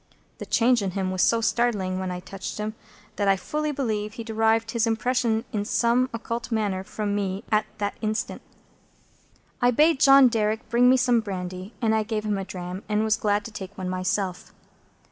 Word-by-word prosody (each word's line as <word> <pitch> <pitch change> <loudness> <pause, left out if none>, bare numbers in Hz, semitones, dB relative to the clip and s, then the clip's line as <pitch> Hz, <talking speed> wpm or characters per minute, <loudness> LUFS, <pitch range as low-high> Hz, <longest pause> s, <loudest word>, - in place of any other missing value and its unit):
The - - -7
change 240 0 +3
in 195 -2 -2
him 190 -1 -1
was 185 0 -1
so 230 0 +3
startling, 210 -6 0
when 185 -1 -3
I 180 0 -5
touched 190 +1 -7
him, 215 +1 -3 0.4
that 205 - 0
I 195 - +5
fully 300 +9 -2
believe 215 -7 -2
he 230 - -6
derived 225 0 +1
his 230 0 +1
impression 230 0 0
in 205 -2 0
some 240 +3 +2
occult 230 +1 -5
manner 205 -4 -1
from 210 +1 -3
me 200 0 -2
at 215 0 +2
that 205 -1 -3
instant. 215 0 -2 1.2
I 245 - +5
bade 300 +4 +4
John 275 -1 +8
Derrick 220 -2 -1
bring 250 +2 +5
some 245 -1 +3
brandy, 185 -1 -6
and 220 -1 +3
I 220 - +2
gave 215 0 -3
him 205 -2 0
a 195 - -4
dram, 180 0 -6
and 210 0 +1
was 220 -1 +2
glad 210 -1 0
to 230 - -7
take 200 -1 -8
one 185 -1 -4
myself. 185 0 -2
215 Hz, 190 wpm, -25 LUFS, 195-235 Hz, 1.2 s, John